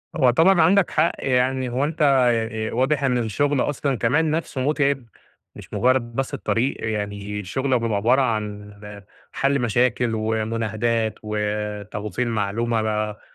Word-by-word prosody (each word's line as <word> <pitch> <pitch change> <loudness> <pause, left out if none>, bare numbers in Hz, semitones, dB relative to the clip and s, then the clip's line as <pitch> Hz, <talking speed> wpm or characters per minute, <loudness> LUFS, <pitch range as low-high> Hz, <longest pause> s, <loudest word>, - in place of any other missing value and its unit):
هو 130 -6 +4
طبعًا 165 +7 +4
عندك 185 +3 +4
حق 160 +2 +2
يعني، 130 0 0
هو 130 +3 -1
أنت 155 +2 -3
آآ 115 -6 +2
واضح 135 +4 +1
إن 125 -2 +2
الشغل 130 +5 0
أصلًا 140 -2 -1
كمان 145 +8 +1
نفسه 155 -4 -2
متعب، 140 -2 0 0.5
مش - - -12
مجرد 125 -1 +1
بس 135 -1 -2
الطريق، 125 +4 -1
يعني 105 -1 -4
شغلك 130 +5 0
بيبقى 115 -3 0
عبارة 125 +7 +3
عن 105 -3 -3 0.6
حل 140 0 +1
مشاكل 120 +1 +1
ومناهدات 110 0 -1
وتوصيل 105 +2 -3
معلومة 115 +1 -1
بقى، 105 -1 -2
120 Hz, 135 wpm, -22 LUFS, 110-135 Hz, 0.6 s, هو